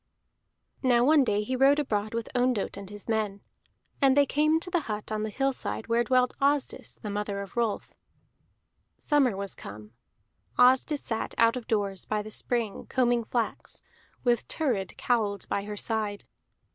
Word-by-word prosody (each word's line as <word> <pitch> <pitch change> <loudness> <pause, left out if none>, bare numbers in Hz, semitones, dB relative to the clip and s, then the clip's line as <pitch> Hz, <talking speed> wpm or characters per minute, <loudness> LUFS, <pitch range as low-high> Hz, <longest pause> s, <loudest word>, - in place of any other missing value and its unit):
Now 245 -2 +4
one 300 0 +6
day 210 -4 +1
he 255 +5 -2
rode 270 +3 +5
abroad 215 -6 -1
with 230 -1 -2
Ondott 245 -4 +1
and 200 -1 -8
his 205 -1 -8
men, 215 -3 -1 0.6
and 270 0 +5
they 285 - +6
came 305 +3 +2
to 360 - -5
the 350 - +3
hut 210 0 -4
on 215 0 -1
the 215 - -2
hillside 270 -1 -2
where 230 +1 +2
dwelt 250 +1 +2
Asdis 280 0 0
the 210 - -3
mother 205 -1 -2
of 200 -1 -8
Rolf. 230 -3 -1 1.0
Summer 270 -9 +2
was 200 -1 -3
come; 105 +1 -10 0.7
Asdis 260 +4 +4
sat 225 -1 -3
out 230 +1 +4
of 250 -2 -6
doors 200 -4 -1
by 210 -1 -1
the 215 - -9
spring 230 -2 -2
combing 240 -3 +2
flax, 235 0 -3 0.4
with 240 -2 +3
Thurid 230 - -1
cowled 210 -5 0
by 200 - -1
her 210 0 -6
side. 215 -2 -2
230 Hz, 165 wpm, -28 LUFS, 205-255 Hz, 1.0 s, one